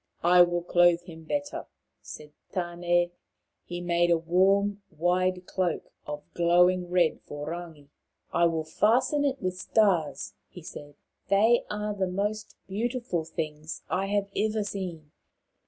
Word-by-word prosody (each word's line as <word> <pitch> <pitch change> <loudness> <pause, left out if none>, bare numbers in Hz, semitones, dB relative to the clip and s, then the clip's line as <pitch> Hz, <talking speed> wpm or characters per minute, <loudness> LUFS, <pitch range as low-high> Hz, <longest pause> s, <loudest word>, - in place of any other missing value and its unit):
" - - -33
I - - +10
will 175 0 +3
clothe 175 0 +4
him 165 -2 -11
better," 290 - -3 0.3
said 150 -1 -10 0.2
Tane. 175 -1 0 0.5
He 175 0 -5
made 175 0 +2
a 170 - +5
warm 195 +4 +2
wide 180 +3 0
cloak 180 -3 -2 0.2
of 150 0 -5
glowing 175 +1 +3
red 175 -3 +2
for 145 +1 -6
Rangi. 165 -4 -8 0.4
"I 170 - +4
will 165 -1 -1
fasten 250 - +2
it 275 -1 0
with 185 0 -2
stars," 170 -11 +1 0.2
he 180 -3 -12
said. 145 -2 -10 0.2
" - - -50
They 220 +4 +4
are 210 0 -2
the 195 -2 -1
most 210 +3 -3
beautiful 220 -4 -2
things 155 -1 -5
I 195 +1 0
have 200 0 0
ever 215 0 0
seen." 180 -7 -6
175 Hz, 145 wpm, -28 LUFS, 170-200 Hz, 0.5 s, I